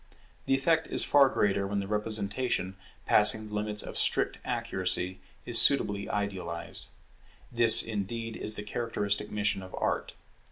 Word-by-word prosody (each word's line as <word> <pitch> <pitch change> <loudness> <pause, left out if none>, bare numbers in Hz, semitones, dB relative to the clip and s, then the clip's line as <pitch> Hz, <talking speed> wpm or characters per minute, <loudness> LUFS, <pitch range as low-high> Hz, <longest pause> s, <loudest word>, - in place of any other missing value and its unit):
The 135 - +3
effect 160 +4 +1
is - - +2
far 140 -2 +5
greater 100 -4 0
when 100 0 -2
the 100 - -4
representation, 105 -1 -1 0.3
passing 110 +1 +3
the - - -11
limits 105 0 -2
of - - -5
strict - - +1
accuracy, 90 +1 -1 0.3
is - - +4
suitably 100 -1 +2
idealized. 95 -5 -4 0.6
This 120 -2 +5
indeed 115 +1 -4
is 110 - +1
the 105 - -5
characteristic 105 -2 -2
mission 105 -2 -1
of 95 0 -9
Art. - - -2
105 Hz, 145 wpm, -29 LUFS, 100-115 Hz, 0.6 s, far